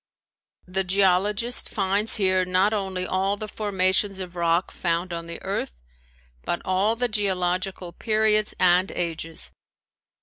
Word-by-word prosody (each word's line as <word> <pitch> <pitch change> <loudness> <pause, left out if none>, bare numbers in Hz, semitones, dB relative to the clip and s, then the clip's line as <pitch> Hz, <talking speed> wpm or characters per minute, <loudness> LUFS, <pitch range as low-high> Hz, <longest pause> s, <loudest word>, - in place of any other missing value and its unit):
The 190 +1 -1
geologist 200 +5 +1
finds 200 +2 +1
here 185 -2 +2
not 185 +3 +2
only 190 -3 -2
all 195 +2 0
the 215 - -5
formations 195 -1 +1
of 180 -2 -7
rock 170 +1 +1
found 175 +1 -2
on 170 0 -5
the 170 - -6
earth, - - -4 0.6
but 175 - -2
all 195 +4 +1
the 245 +1 0
geological 185 -4 -1
periods 215 -1 +2
and 180 +1 +4
ages. 165 -2 -3
190 Hz, 130 wpm, -24 LUFS, 180-205 Hz, 0.6 s, and